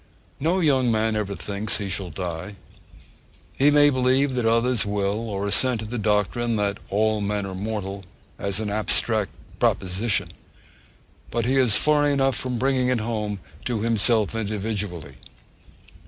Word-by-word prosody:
No 170 +6 +1
young 130 -6 +3
man 110 0 +1
ever 100 -2 -2
thinks 100 +4 -2
he 100 - -4
shall 95 -1 -2
die. 85 +4 -5 1.0
He 140 +2 +4
may 145 0 +5
believe 130 +1 +2
that 125 -3 0
others 115 0 +2
will, 105 +2 -2
or 100 -1 -3
assent 115 +3 +2
to - - -5
the 120 +2 -4
doctrine 110 +3 0
that 100 -1 -1
'all 110 +1 +1
men 100 0 -1
are 95 - -6
mortal' 100 0 -4 0.4
as 100 0 -2
an 105 -2 -3
abstract 110 0 +2 0.3
proposition, 95 +4 +1 1.0
but 115 -1 -1
he 130 +2 +1
is 125 -5 +5
far 150 -1 +3
enough 135 -2 +2
from 125 0 -2
bringing 130 0 +1
it 125 -2 +1
home 105 -3 -3 0.2
to 120 -4 -1
himself 115 -1 +2
individually. 105 - -4
110 Hz, 150 wpm, -24 LUFS, 100-125 Hz, 1.0 s, may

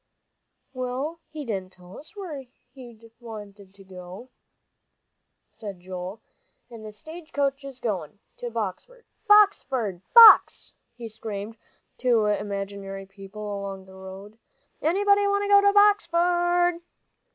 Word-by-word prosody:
"Well, 260 +6 -4
he 305 -2 -7
didn't 190 -5 -5
tell 180 +1 -15
us 310 - -13
where 320 -10 -7 0.3
he 250 -3 -12
did 225 +1 -19
want 215 -4 -10
to 195 -1 -17
go," 185 +6 -11 1.2
said 200 -4 -9
Joel, 185 +3 -8 0.5
"and 230 -2 -11
th' 215 - -8
stage 315 +8 -12 0.3
is 270 -2 -10
goin' 200 -7 -4 0.2
to 240 - -5
Boxford. 230 - -6 0.3
Boxford, 265 - +3
Box," 465 -1 +8 0.2
he 235 -1 -8
screamed 220 -1 -7 0.4
to 240 -4 +2
imaginary 200 -1 -4
people 195 +2 -11 0.2
along 195 -1 -7
the 190 - -16
road. 190 +3 -11 0.4
"Anybody 405 +4 +2
want 400 0 +1
to 405 - -3
go 405 0 +7
to 405 0 +4
Boxford?" 350 -3 +2
225 Hz, 125 wpm, -25 LUFS, -, 1.2 s, Box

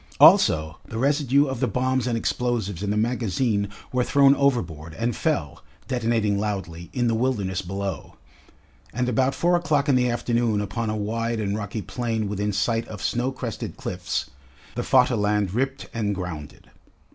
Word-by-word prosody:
Also 80 0 +6
the 110 - -7
residue 140 +1 +3
of 130 -3 -3
the - - +1
bombs 130 0 0
and 120 -2 0
explosives 115 -6 -1
in 100 - -2
the 105 - 0
magazine 110 -2 0 0.2
were 125 -1 +2
thrown 140 +1 +5
overboard 90 - 0
and 115 +2 -1
fell, 75 -2 -1 0.2
detonating 115 -5 +1
loudly, 95 -5 -4
in 125 -1 0
the 115 - +2
wilderness 110 -6 0
below. 95 0 -5 0.8
And 125 +1 -1
about 130 +2 +1
four 175 +1 +3
o'clock 155 -4 +1
in 140 - +4
the 125 -1 +3
afternoon 120 -2 +1
upon 105 +3 -2
a 110 - -1
wide 115 +2 -2
and 100 -1 -1
rocky 105 0 -4
plain 115 -3 -2
within 105 +1 -1
sight 115 +3 0
of 105 -2 -8
snow 120 +5 0
crested 125 -4 -5
cliffs, - - -3 0.4
the - - -2
Vaterland 105 -6 +2
ripped 135 +3 -1
and 105 -3 -1
grounded. 85 -6 -7
115 Hz, 160 wpm, -24 LUFS, 100-125 Hz, 0.8 s, Also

